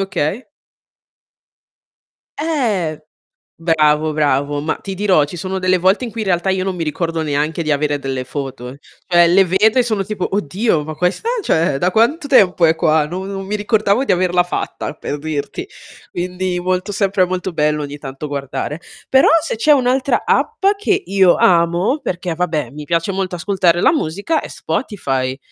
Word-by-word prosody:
Okay. 195 - -2 1.9
Eh. 220 - -1 0.6
Bravo, 155 -1 +2
bravo, 145 -1 0
ma 155 - -1
ti 195 - -7
dirò, 185 -7 +3
ci 145 - -9
sono 190 +2 -4
delle 185 0 +2
volte 190 +7 +2
in 230 - -7
cui 225 0 -5
in 205 - -4
realtà 175 +1 +1
io 190 -1 0
non 190 -1 -3
mi 165 - -2
ricordo 165 +1 -2
neanche 150 +2 -1
di 155 -2 +1
avere 145 0 -1
delle 135 -2 -3
foto. 130 -1 -6 0.3
Cioè 175 -1 +5
le 190 +3 +5
vedo 205 +7 +2
e 250 - +4
sono 215 -5 -1
tipo: 200 -3 -4
"Oddio, 190 -2 0
ma 155 - -5
questa 180 - -1 0.2
cioè 160 -4 +1
da 180 +5 +1
quanto 285 - +2
tempo 190 - +4
è 160 - +4
qua? 155 -1 +2
No 180 +4 -5
non 195 0 -5
mi 210 +2 -2
ricordavo 210 +3 +1
di 195 - +3
averla 180 0 +2
fatta", 175 - -4
per 145 - -5
dirti. 155 - -4 0.4
Quindi 180 +1 -3
molto 185 +2 -1
sempre 195 -2 +2
molto 185 0 -3
bello 150 -1 0
ogni 145 0 -7
tanto 140 +1 -7
guardare. 140 +2 -4 0.3
Però, 265 0 +5 0.2
se 315 - -3
c'è 300 +7 +3
un'altra 260 0 +1
app 450 - 0
che 400 -1 0
io 190 -3 +4
amo, 175 - +2
perché, 180 -1 -3
vabbè, 160 -6 -1
mi 150 +1 -8
piace 170 +4 0
molto 190 -1 -3
ascoltare 175 -1 +1
la - - +5
musica, 205 - -1
è - - -7
Spotify. 135 - -3
180 Hz, 175 wpm, -18 LUFS, 155-200 Hz, 1.9 s, Cioè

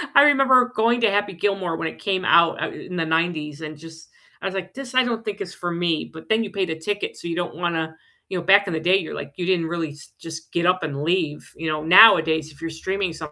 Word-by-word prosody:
I 280 - +9
remember 265 -3 +5
going 235 +2 +2
to 225 - +3
Happy 205 -1 0
Gilmore 185 -2 -1
when 165 - -3
it - - -8
came 190 -3 -1
out, 170 -1 +4
uh, - - -3
in 180 - -9
the 165 -2 -1
'90s, 160 -2 -1
and 155 -1 -7
just 160 +1 -14 0.3
I - - -2
was, 195 - -5
like, 185 -1 -5
"This 265 -1 -8
I 255 - +5
don't 230 -2 -3
think 210 -2 -5
is 195 -2 -6
for 175 - -5
me," 170 -2 -1
but 160 0 -12
then 220 +1 +2
you 210 - -6
paid 190 -4 -2
a 160 - -5
ticket, 205 +4 -3
so - - -9
you 170 - -3
don't 175 -2 -3
wanna 165 -2 -2 0.3
you 185 - -3
know, 175 - -4
back 200 +3 +5
in 180 - -3
the 160 - -1
day, 180 +4 +3
you're, 180 -5 -2
like, - - -7
you 175 - -3
didn't 175 -3 +1
really 165 -1 -3
s 145 0 -15
just 160 0 -9
get 170 +1 0
up 185 -2 +2
and 145 -2 -4
leave, 160 -2 -1
you 160 0 -5
know? 155 0 -2
Nowadays, 160 -4 +6
if 145 - -19
you're 165 - -4
streaming 190 +3 -3
something, 155 -2 -8
175 Hz, 270 wpm, -22 LUFS, 160-200 Hz, 0.3 s, I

